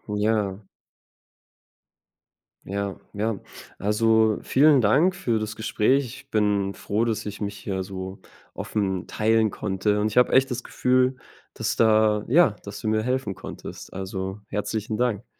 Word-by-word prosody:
Ja. 105 -2 0 2.0
Ja, 100 0 -3
ja. 105 0 -1 0.4
Also, 110 +1 +3
vielen 145 -1 +5
Dank 150 - +3
für 120 -12 0
das 110 0 -4
Gespräch. 115 +5 +1
Ich 115 - -11
bin 100 -2 +1
froh, 110 +3 -1
dass 110 -2 -2
ich 105 - -6
mich 100 -1 -4
hier 95 -2 -3
so 95 0 -7 0.3
offen 95 -3 -2
teilen 110 -1 +2
konnte. 105 +1 -1
Und 105 - +2
ich 110 - -4
habe 125 - +5
echt 130 0 +4
das 125 +1 -3
Gefühl, 130 +1 +2 0.4
dass - - -2
da 110 -2 +4
ja, 130 -5 +4
dass 100 0 -8
du 110 - -4
mir 110 0 +1
helfen 125 -6 -1
konntest. 95 - -9
Also 95 +1 -5
herzlichen 105 +1 -3
Dank. 120 -2 0
110 Hz, 145 wpm, -25 LUFS, 100-115 Hz, 2.0 s, vielen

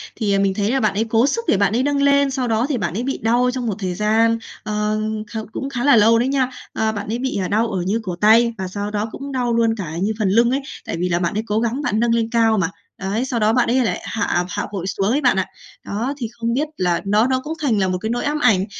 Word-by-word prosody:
Thì, 210 -3 0
à, 195 - +2
mình 195 -1 +2
thấy 205 +2 0
là 270 - +1
bạn 215 -4 +1
ấy 215 +3 +1
cố 230 +4 +3
sức 465 +10 -1
để - - +3
bạn 200 +1 +2
ấy 250 - +2
nâng 285 0 +1
lên, 280 -1 +3
sau 260 -2 -1
đó 225 +1 +1
thì 280 - 0
bạn 170 -6 -2
ấy 230 +5 -2
bị 270 - -2
đau 240 +3 +2
trong 250 -2 -3
một 210 - -1
thời 185 -2 -2
gian, 225 +3 +2 0.3
ờ, 210 0 -1 0.3
kh 225 - -3
cũng 270 +4 -4
khá 245 -3 -3
là 285 -2 +6
lâu 225 +1 +5
đấy 245 - +1
nha. 265 -2 +1 0.2
Ờ, 220 0 0
bạn 205 -1 -5
ấy 225 +3 -2
bị, 260 -4 -2
à, 185 - -1
đau 225 +3 +1
ở 185 - -1
như 200 +6 0
cổ 180 -3 -4
tay 230 +2 +5
và 190 -1 -3
sau 205 +2 -4
đó 210 +1 -2
cũng 275 0 -7
đau 245 -3 0
luôn 230 -1 +2
cả 170 -7 -5
như 210 +3 +1
phần 205 -3 +1
lưng 235 +4 +4
ấy, 275 +2 0 0.2
tại - - -3
vì 180 - 0
là 170 0 +1
bạn 170 -1 -1
ấy 215 +2 -1
cố 210 +1 +1
gắng 235 +5 -1
bạn 215 -6 0
nâng 235 0 +2
lên 230 -1 0
cao 225 -2 +3
mà, 175 -4 +1 0.3
đấy, 200 +6 -1
sau 250 -3 -2
đó 215 +1 +3
bạn 245 -1 +2
ấy 255 +2 +3
lại 180 - -1
hạ 180 -4 -1
hạ 205 +1 -3
vội 190 -2 -4
xuống 195 +1 -1
ấy 285 - +1
bạn 250 -7 +3
ạ. 190 - +1 0.4
Đó, 230 +7 -2
thì 240 - -3
không 235 0 -2
biết 295 +4 0
là 175 -2 +1
nó 210 +4 +3
nó 260 0 0
cũng 315 - -4
thành 245 -7 +1
là 190 - +2
một 185 0 -1
cái 220 - -2
nỗi 240 +1 -1
ám 295 +1 -1
ảnh, 210 -8 +3
225 Hz, 300 wpm, -20 LUFS, 205-250 Hz, 0.4 s, là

